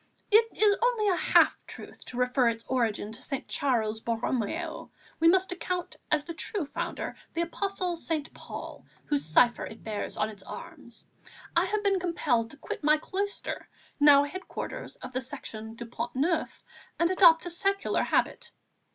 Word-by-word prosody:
It 445 Hz, +2 st, +7 dB
is 415 Hz, -2 st, +5 dB
only 470 Hz, -4 st, +2 dB
a 370 Hz, -, +3 dB
half -, -, +4 dB
truth -, -, -10 dB
to 245 Hz, -, -8 dB
refer 250 Hz, 0 st, +3 dB
its 230 Hz, 0 st, -5 dB
origin 225 Hz, -5 st, 0 dB
to 225 Hz, -, -7 dB
St. 275 Hz, -, -4 dB
Charles 225 Hz, -5 st, 0 dB
Borromeo; 230 Hz, -1 st, -2 dB, 0.3 s
we 330 Hz, -, +5 dB
must 375 Hz, +2 st, +4 dB
account 360 Hz, 0 st, -3 dB, 0.2 s
as 305 Hz, -1 st, +3 dB
the 335 Hz, -, -6 dB
true 350 Hz, +1 st, -2 dB
founder -, -, -4 dB, 0.2 s
the 340 Hz, -, +1 dB
Apostle 365 Hz, +1 st, -2 dB
St. 320 Hz, -2 st, -3 dB
Paul, -, -, -8 dB, 0.2 s
whose 290 Hz, -1 st, 0 dB
cipher 240 Hz, +10 st, +4 dB
it 220 Hz, -, -9 dB
bears 215 Hz, -2 st, -4 dB
on 215 Hz, -, +1 dB
its 205 Hz, -3 st, -10 dB
arms. -, -, -10 dB, 0.5 s
I -, -, +4 dB
have 425 Hz, 0 st, -1 dB
been 395 Hz, -2 st, +3 dB
compelled 280 Hz, -10 st, 0 dB
to 290 Hz, -, -14 dB
quit 290 Hz, -, -6 dB
my 305 Hz, +1 st, +5 dB
cloister, 400 Hz, +6 st, -4 dB, 0.3 s
now 290 Hz, -1 st, +8 dB
headquarters 370 Hz, +9 st, -6 dB
of -, -, -10 dB
the 255 Hz, -, -1 dB
Section 225 Hz, -4 st, -5 dB
du 235 Hz, -, -7 dB
Pont 235 Hz, +1 st, -5 dB
Neuf, 320 Hz, +5 st, 0 dB, 0.3 s
and 340 Hz, +1 st, +2 dB
adopt 345 Hz, -3 st, +6 dB
a 350 Hz, -, 0 dB
secular 395 Hz, +3 st, +1 dB
habit. -, -, 0 dB
300 Hz, 170 wpm, -28 LUFS, 240-365 Hz, 0.5 s, now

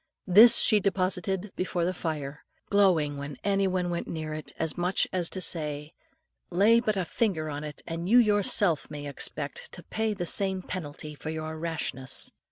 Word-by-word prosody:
This 210 Hz, +6 st, +8 dB
she 215 Hz, -3 st, +6 dB
deposited 190 Hz, 0 st, -1 dB
before 180 Hz, -2 st, -1 dB
the 180 Hz, -, -1 dB
fire, 150 Hz, -4 st, -5 dB, 0.3 s
growling 170 Hz, -8 st, +3 dB
whenever 140 Hz, 0 st, -7 dB
any 195 Hz, -1 st, +1 dB
one 180 Hz, -1 st, -1 dB
went 170 Hz, -, -3 dB
near 155 Hz, -1 st, -5 dB
it, 155 Hz, 0 st, -7 dB
as 160 Hz, -1 st, -2 dB
much 180 Hz, +1 st, 0 dB
as 180 Hz, -3 st, 0 dB
to 185 Hz, -, -4 dB
say, 150 Hz, -2 st, 0 dB, 0.6 s
"Lay 205 Hz, +6 st, +4 dB
but 215 Hz, -3 st, -1 dB
a 185 Hz, -, -1 dB
finger 165 Hz, -7 st, -1 dB
on 145 Hz, +1 st, -5 dB
it, 150 Hz, -2 st, -8 dB
and 170 Hz, +2 st, -4 dB
you 240 Hz, -, +6 dB
yourself 205 Hz, -, +3 dB
may 145 Hz, -1 st, -7 dB
expect 140 Hz, 0 st, -4 dB
to 175 Hz, -, -9 dB
pay 220 Hz, -1 st, -2 dB
the 175 Hz, -3 st, -3 dB
same 190 Hz, +1 st, 0 dB
penalty 155 Hz, -4 st, -6 dB
for 150 Hz, +2 st, -7 dB
your 160 Hz, 0 st, -4 dB
rashness." 155 Hz, -6 st, -3 dB
175 Hz, 175 wpm, -27 LUFS, 155-195 Hz, 0.6 s, This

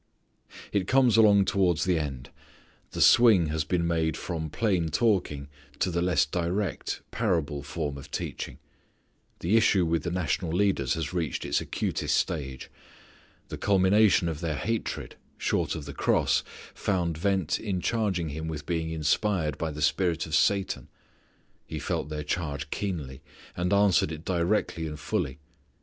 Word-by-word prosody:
It 95 Hz, -3 st, 0 dB
comes 130 Hz, -4 st, +4 dB
along 105 Hz, -3 st, +6 dB
towards 95 Hz, -4 st, +2 dB
the 90 Hz, -3 st, +2 dB
end. 70 Hz, -5 st, -5 dB, 0.6 s
The -, -, -4 dB
swing 105 Hz, -9 st, +6 dB
has 80 Hz, 0 st, 0 dB
been 85 Hz, +3 st, 0 dB
made 80 Hz, -1 st, 0 dB
from 80 Hz, -3 st, -4 dB
plain 90 Hz, -3 st, 0 dB
talking 85 Hz, -, +1 dB, 0.3 s
to 90 Hz, -, 0 dB
the 85 Hz, 0 st, 0 dB
less 85 Hz, -6 st, +3 dB
direct, 90 Hz, +5 st, -2 dB
parable 80 Hz, -10 st, 0 dB
form 70 Hz, -1 st, -4 dB
of 70 Hz, -, -11 dB
teaching. -, -, -5 dB, 0.8 s
The 90 Hz, +6 st, +2 dB
issue 100 Hz, -5 st, +4 dB
with 80 Hz, 0 st, +1 dB
the 85 Hz, -, -3 dB
national 85 Hz, -1 st, -1 dB
leaders 90 Hz, -9 st, +1 dB
has 80 Hz, 0 st, -3 dB
reached 85 Hz, -4 st, -2 dB
its -, -, +1 dB
acutest -, -, -1 dB
stage. 70 Hz, -5 st, -2 dB, 0.8 s
The -, -, -6 dB
culmination 100 Hz, -1 st, +4 dB
of 80 Hz, -3 st, -3 dB
their 80 Hz, -2 st, -2 dB
hatred, 115 Hz, +9 st, -3 dB, 0.2 s
short -, -, 0 dB
of 75 Hz, -, -6 dB
the 70 Hz, -, -7 dB
cross, -, -, +2 dB, 0.3 s
found 90 Hz, -5 st, -1 dB
vent 95 Hz, -1 st, 0 dB
in 100 Hz, -4 st, -2 dB
charging 95 Hz, -6 st, 0 dB
Him 80 Hz, +2 st, -5 dB
with 75 Hz, -2 st, -5 dB
being 80 Hz, -1 st, -1 dB
inspired 80 Hz, 0 st, 0 dB
by 80 Hz, -, -1 dB
the 75 Hz, 0 st, -4 dB
spirit 85 Hz, +1 st, +1 dB
of 80 Hz, -, -8 dB
Satan. 95 Hz, +4 st, +1 dB, 0.8 s
He -, -, -5 dB
felt 75 Hz, -, -2 dB
their 75 Hz, -1 st, -4 dB
charge 75 Hz, -2 st, -3 dB
keenly 75 Hz, -10 st, -4 dB, 0.3 s
and 90 Hz, +1 st, -1 dB
answered 100 Hz, -3 st, +4 dB
it 80 Hz, +1 st, -7 dB
directly 85 Hz, -2 st, 0 dB
and 75 Hz, -1 st, -7 dB
fully. 70 Hz, -2 st, -2 dB
85 Hz, 155 wpm, -27 LUFS, 75-95 Hz, 0.8 s, along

